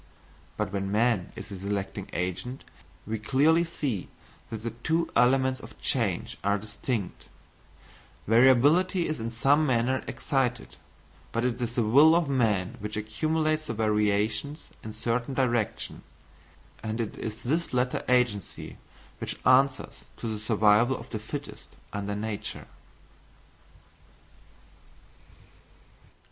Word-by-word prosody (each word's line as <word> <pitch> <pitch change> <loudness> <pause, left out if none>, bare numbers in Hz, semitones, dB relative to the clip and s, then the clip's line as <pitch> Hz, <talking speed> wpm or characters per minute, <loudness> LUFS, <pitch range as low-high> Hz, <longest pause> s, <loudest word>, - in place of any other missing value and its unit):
But 105 -2 -2
when 100 -1 -2
man 110 -3 +2
is - - -8
the 100 - -6
selecting 100 0 -3
agent, 90 +9 -3 0.4
we 110 +1 -3
clearly 145 +9 +3
see 140 - -3 0.4
that 110 -1 -6
the 115 - -2
two 160 +8 -1
elements 130 +1 +3
of - - -13
change 105 -9 -1
are 100 +1 +2
distinct; 105 0 -4 1.0
variability 140 - +5
is 155 - -3
in 115 +1 -3
some 135 +6 +3
manner 130 -1 +1
excited, 125 -6 -1 0.6
but 115 +1 0
it 125 0 -1
is 120 0 -2
the 120 - +2
will 145 +9 +6
of 170 -3 +2
man 110 -9 +1
which 105 +1 -5
accumulates 155 +8 0
the 115 - -3
variations 105 +7 0
in 110 - -6
certain 115 +4 -2
direction; 120 -4 0 0.8
and 110 +1 -3
it 110 -3 -3
is 110 +1 -5
this 155 +6 0
latter 125 0 0
agency 125 -6 0 0.4
which - - -4
answers 130 +1 +3 0.2
to 115 - -5
the 110 -1 -3
survival 110 +3 +3
of 115 +2 -11
the 110 - -3
fittest 145 +7 -7 0.3
under 100 0 -3
nature. 105 0 -4
115 Hz, 125 wpm, -28 LUFS, 105-135 Hz, 1.0 s, will